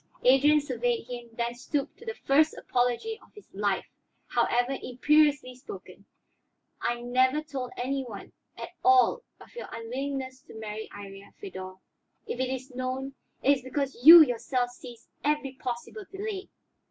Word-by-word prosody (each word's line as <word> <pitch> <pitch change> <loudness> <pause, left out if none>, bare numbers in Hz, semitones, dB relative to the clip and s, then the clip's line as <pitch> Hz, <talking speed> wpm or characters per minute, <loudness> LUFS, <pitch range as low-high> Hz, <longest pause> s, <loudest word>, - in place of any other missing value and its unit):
Adrian 280 +4 +6
surveyed 245 -5 -1
him, 240 -1 -8
then 235 +1 -2
stooped 275 +3 -3
to 465 - -13
the 455 - -3
first 310 -4 +2
apology 250 - -1
of - - -22
his 420 - -14
life, 200 -1 0 0.4
however 245 +3 +1
imperiously 290 +1 +2
spoken. 285 - -11 0.8
"I 240 0 -1
never 255 +4 +2
told 270 -4 -5
any 265 +2 -1
one 215 -6 -9 0.3
at - - -6
all 385 +4 +5 0.2
of - - -16
your 485 - -6
unwillingness 260 +3 -5
to - - -12
marry 220 0 -6
Iría, 195 0 -11
Feodor. 185 -1 -8 0.5
If 245 - -5
it 260 -1 0
is 260 0 -5
known, 260 +2 -3 0.3
it 280 +1 +5
is 260 - -13
because 260 -1 -3
you 330 +3 +12
yourself 245 -1 -1
seized 240 -1 -12 0.2
every 295 -2 0
possible 255 - -6
delay. 395 0 -5
255 Hz, 150 wpm, -28 LUFS, 240-290 Hz, 0.8 s, you